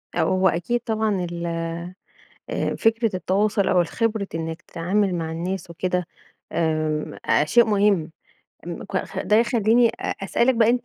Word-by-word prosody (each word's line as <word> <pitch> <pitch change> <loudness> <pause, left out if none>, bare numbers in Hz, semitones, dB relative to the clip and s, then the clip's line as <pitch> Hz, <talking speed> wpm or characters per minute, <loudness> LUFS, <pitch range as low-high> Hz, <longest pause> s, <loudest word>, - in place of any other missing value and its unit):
ه - - 0
هو 190 0 +3
أكيد 175 +9 -1
طبعًا 215 -5 0
ال 170 0 -4 1.1
آآ، - - -1
فكرة 225 -3 +2
التواصل 200 +3 +1
أو 180 - +4
الخبرة 215 +3 -1
إنَّك 165 0 -4
تتعامل 185 +3 0
مع 160 -1 -3
الناس 175 +1 -4
وكده، 180 +1 -1 0.5
امم، 155 -2 -1
أ 150 - +3
شيء 235 +10 +5
مهم. 200 -6 +2 0.6
م - - -5
ك - - -4
ده 210 - +3
يخليني 230 +1 +4
أ - - -4
أسألك 240 +6 +2
بقى 230 0 +4
أنت 245 0 0
195 Hz, 150 wpm, -23 LUFS, 170-220 Hz, 1.1 s, شيء